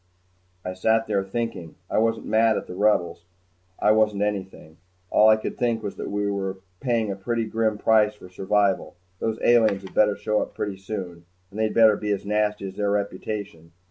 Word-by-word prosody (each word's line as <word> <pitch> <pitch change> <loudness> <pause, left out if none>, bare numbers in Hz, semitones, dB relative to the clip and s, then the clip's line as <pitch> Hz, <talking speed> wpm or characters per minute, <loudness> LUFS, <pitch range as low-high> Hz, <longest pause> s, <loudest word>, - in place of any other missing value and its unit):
I 90 - -3
sat 110 +4 +1
there, 100 -3 0
thinking. 95 -5 -4
I - - 0
wasn't 115 0 0
mad 110 0 +3
at - - -4
the - - -8
Rebels. 90 -4 +1 0.5
I 105 - +3
wasn't 105 -2 +2
anything. 95 -6 -5 0.3
All 110 - +6
I 110 - +7
could 110 - -6
think 115 -2 0
was 100 - -4
that - - -5
we 105 0 -1
were 95 -1 -2 0.2
paying 115 -5 0
a - - -3
pretty 115 +4 -2
grim 110 -1 0
price 105 -1 +3
for 105 - -13
survival. 95 +1 0 0.2
Those 110 -1 -2
aliens 110 -5 +4
had 95 - -11
better 105 -1 +3
show 105 +1 0
up - - -6
pretty 100 -2 -3
soon 95 -4 -7 0.3
and 105 - -8
they'd 110 -1 0
better 110 -2 +6
be 105 - -4
as 100 -1 -1
nasty 105 -1 0
as 95 - -13
their 105 -1 0
reputation. 100 -4 -4
105 Hz, 195 wpm, -24 LUFS, 95-110 Hz, 0.5 s, I